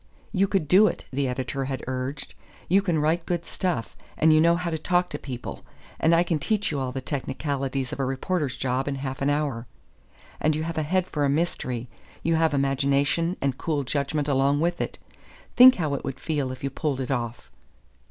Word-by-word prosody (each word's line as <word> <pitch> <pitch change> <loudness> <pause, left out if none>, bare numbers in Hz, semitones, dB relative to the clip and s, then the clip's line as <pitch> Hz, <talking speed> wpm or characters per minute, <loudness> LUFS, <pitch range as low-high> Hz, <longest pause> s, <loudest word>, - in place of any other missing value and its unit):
"You 195 -1 +2
could 190 -6 0
do 195 +7 +7
it," - - -4
the 135 0 0
editor 130 +1 -2
had 135 -1 -4
urged. 130 +2 -4 0.3
"You 195 +3 +4
can 175 -5 0
write 160 +3 +1
good 175 -1 -1
stuff, 175 -12 -2 0.2
and 160 0 +5
you 155 - +5
know 170 +1 +5
how 170 -1 -2
to 160 - -2
talk 180 +2 +1
to 145 - -4
people, 125 -3 -7 0.4
and 165 +1 +4
I 170 - +4
can 165 -3 -1
teach 210 +2 0
you 145 - -1
all 130 -1 -2
the 135 +1 -4
technicalities 135 -1 -3
of - - -6
a 135 - +1
reporter's 135 +2 -1
job 130 +1 -1
in 140 - -1
half 135 -1 -5
an 140 - +2
hour. 145 -5 -1 0.7
And 155 0 +2
you 155 - -2
have 165 0 -2
a - - +1
head 180 +4 +1
for 150 -5 -2
a 140 - +3
mystery; 130 -6 -1 0.4
you 165 - +2
have 160 -2 +2
imagination 140 +5 +1
and 135 -2 -1
cool 150 -4 -1
judgment 140 +2 -1
along 140 +1 +2
with 170 +2 0
it. - - -4 0.6
Think 255 +1 +9
how 155 -5 -1
it 140 - -3
would 135 -1 -5
feel 145 -4 -1
if 130 - -9
you 140 - -1
pulled 140 -1 -2
it 130 0 -3
off!" 120 -2 -3
145 Hz, 210 wpm, -25 LUFS, 135-165 Hz, 0.7 s, Think